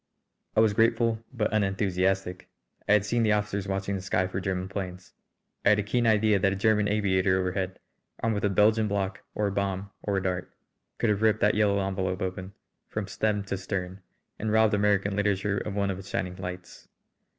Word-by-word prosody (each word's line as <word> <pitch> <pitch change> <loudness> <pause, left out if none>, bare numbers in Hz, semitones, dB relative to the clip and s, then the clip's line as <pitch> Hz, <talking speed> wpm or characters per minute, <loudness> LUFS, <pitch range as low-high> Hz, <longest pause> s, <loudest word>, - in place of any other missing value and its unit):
I 110 - +5
was 110 -2 +4
grateful 115 0 +2
but 110 -4 -1
unenthusiastic. 95 -2 0 0.4
I - - +7
had 105 -1 +4
seen 120 +3 +1
the 110 -2 +3
officers 105 -2 -1
watching 95 +1 -2
the 95 - -4
sky 95 0 0
for 95 0 -3
German 95 -1 -2
planes. 95 -2 -6 0.5
I - - +5
had 105 - +5
a 105 - 0
keen 120 +3 +1
idea 110 -2 +4
that 95 +1 +2
a - - -1
German 105 +1 +2
aviator 95 -2 +2
overhead, 95 0 -2 0.4
armed 115 - 0
with 105 - -2
a 105 - +3
Belgian 105 +3 +3
block 100 -1 -2
or 105 - 0
a 100 - 0
bomb 100 0 -2
or 100 -2 -1
a 95 - -1
dart, 90 -1 -2 0.5
could 115 - +2
have 105 0 -1
ripped 110 -1 +3
that 105 - +4
yellow 105 -1 +2
envelope 95 -1 -2
open 95 +1 -5 0.4
from 105 -1 -3
stem 105 0 0
to 100 0 -3
stern, 95 0 -4 0.4
and 110 0 -1
robbed 110 0 +4
American 100 -1 +2
literature 100 0 0
of 105 - -5
one 100 -1 +1
of 95 - -5
its 95 - -10
shining 90 -1 -2
lights. 90 -1 -8
100 Hz, 200 wpm, -27 LUFS, 95-105 Hz, 0.5 s, I